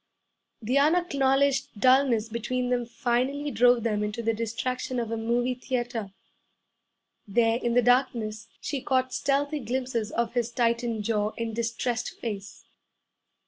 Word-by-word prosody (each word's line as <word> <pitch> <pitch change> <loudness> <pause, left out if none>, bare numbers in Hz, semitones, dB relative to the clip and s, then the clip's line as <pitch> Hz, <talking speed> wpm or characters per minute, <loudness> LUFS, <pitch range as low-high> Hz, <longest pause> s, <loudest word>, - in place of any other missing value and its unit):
The 250 +6 +2
unacknowledged 280 -6 +2
dullness 255 -2 +4
between 245 +2 -2
them 245 -1 0
finally 255 +5 -1
drove 245 -2 +4
them 210 -2 0
into 210 +3 -3
the 225 0 +1
distraction 245 +3 -3
of 230 -1 -3
a - - 0
movie 240 +3 0
theatre. 240 -4 -3 1.2
There, 225 +3 +2
in 235 0 0
the 245 - +5
darkness, 235 -3 +1
she 285 -2 -3
caught 260 -1 0
stealthy 285 +2 0
glimpses 245 -2 -2
of 235 -1 -1
his 240 -2 0
tightened 235 -2 0
jaw 210 0 0
and 230 -1 -3
distressed 235 +1 -2
face. 200 -4 -6
240 Hz, 135 wpm, -27 LUFS, 225-255 Hz, 1.2 s, the